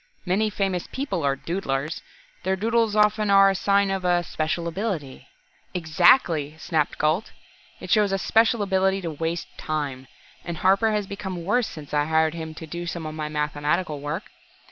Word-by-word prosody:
Many 200 +4 +1
famous 195 -3 -2
people 260 - -2
are 140 -1 +2
'doodlers.' 155 -2 -3 0.4
Their 190 - 0
doodles 225 +1 +1
often 210 0 +3
are 195 0 +7
a - - -2
sign 200 +1 +2
of 180 -2 +1
special 160 +2 -2
ability 170 - -4 0.2
" - - -36
"Exactly!" 160 - +3
snapped 155 -2 -1
Gault. 155 +7 0 0.5
"It - - -7
shows 210 -3 +4
a 195 - +1
special 225 +2 +3
ability 190 0 +1
to 170 -3 -3
waste 165 +3 -4
time. 140 -4 -3 0.4
And 170 -1 -5
Harper 195 +6 +3
has 210 -1 0
become 190 -3 -6
worse 225 +4 +2
since 150 -3 -10
I 145 0 +2
hired 160 0 +2
him 160 -1 -6
to 160 - -8
do 170 +2 -6
some 170 -1 -4
of 155 - -5
my 155 -1 -4
mathematical 150 +2 -1
work. 150 +6 -5
175 Hz, 170 wpm, -24 LUFS, 155-200 Hz, 0.5 s, are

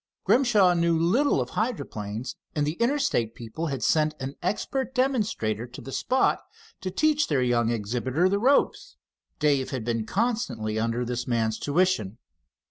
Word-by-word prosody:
Grimshaw 215 -9 +4
knew 170 -1 +2
little 195 - +2
of 125 -1 -3
hydroplanes, 125 - -3 0.2
and 150 -1 +1
the 150 - -1
Interstate 235 - +1
people 120 +8 -5
had 135 -3 -3
sent 155 -1 +2
an 135 +1 -4
expert 260 +8 -2
demonstrator 210 - 0
to 125 - -11
the 135 - -9
spot 260 - +1 0.4
to 185 - -4
teach 300 +8 +2
their 140 -4 +1
young 120 -2 +2
exhibitor 120 - 0
the 200 +2 +1
ropes. 275 - +2 0.4
Dave 140 -3 +1
had 130 -5 -4
been 115 -2 -1
constantly 190 - -1
under 115 +2 -1
this 125 0 -3
man's 115 -2 0
tuition. 145 - +1
145 Hz, 150 wpm, -26 LUFS, -, 0.4 s, Grimshaw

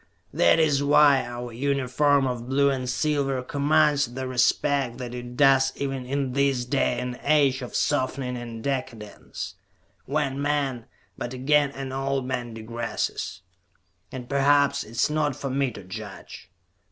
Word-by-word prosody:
That 85 - +4
is 150 -3 +3
why 145 -2 +5
our 120 0 -7
uniform 140 +2 +1
of 125 -1 -4
blue 140 +1 +3
and 130 -2 -3
silver 135 -1 0
commands 145 -1 +2
the 130 0 -3
respect 130 0 +1
that 125 -2 -6
it 125 0 -7
does 135 -2 +5
even 135 -2 -4
in 135 -1 -2
this 135 -2 +1
day 125 -1 0
and 125 0 -5
age 140 -3 +3
of 125 - -7
softening 130 -3 0
and 115 -2 -7
decadence, 125 -6 -5 0.5
when 140 -1 -1
men 140 -5 -1 0.3
but 120 +1 -4
again 145 +2 +3
an 135 -1 -6
old 135 0 -2
man 120 -3 -4
digresses. 115 -4 -4 0.7
And 130 -2 -7
perhaps 140 +1 +3
it - - -14
is 115 - +2
not 150 -3 0
for 135 - -4
me 135 0 +1
to 105 - -10
judge. 100 +2 -9
135 Hz, 150 wpm, -25 LUFS, 125-140 Hz, 0.7 s, why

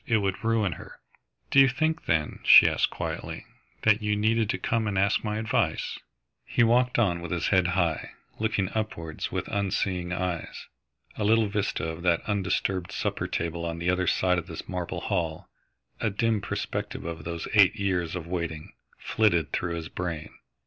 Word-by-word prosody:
It 115 - +3
would 95 -3 -2
ruin 110 -4 +2
her." 75 - -10 0.5
"Do 135 - +6
you 135 - +8
think, 155 +5 -1
then," 80 -2 0
she - - +9
asked - - +2
quietly, - - -5 0.4
"that 105 -1 +4
you 105 0 +1
needed 110 +1 +1
to 130 - 0
come 115 -2 0
and 100 -2 -1
ask 100 +2 +2
my 105 -1 -2
advice?" 110 0 -1 0.4
He 120 - +2
walked 125 +2 +3
on 90 -7 +2
with 85 - -6
his 85 0 -1
head 95 -3 +3
high, 85 -4 0 0.3
looking 110 -4 0
upwards 85 -8 -3
with - - -3
unseeing 95 -3 -1
eyes. 90 -2 -3 0.5
A 110 - -1
little 110 +1 +4
vista 100 -5 -1
of 80 +1 -5
that 85 -2 +2
undisturbed 95 -2 -1
supper - - -2
table 85 0 -3
on 85 0 -3
the 85 +2 +1
other 90 0 0
side 90 -1 +2
of 85 - -8
the - - -7
marble 90 -2 -4
hall, 80 -2 -2 0.5
a 110 - +1
dim 110 +1 0
perspective - - -4
of 80 -2 -5
those 85 0 -4
eight 100 -1 +6
years 90 -5 -1
of 85 -3 -5
waiting, 85 -3 -4 0.2
flitted 85 -8 +1
through 85 -1 -1
his 80 -1 -5
brain. 80 -4 -4
95 Hz, 175 wpm, -27 LUFS, 85-110 Hz, 0.5 s, she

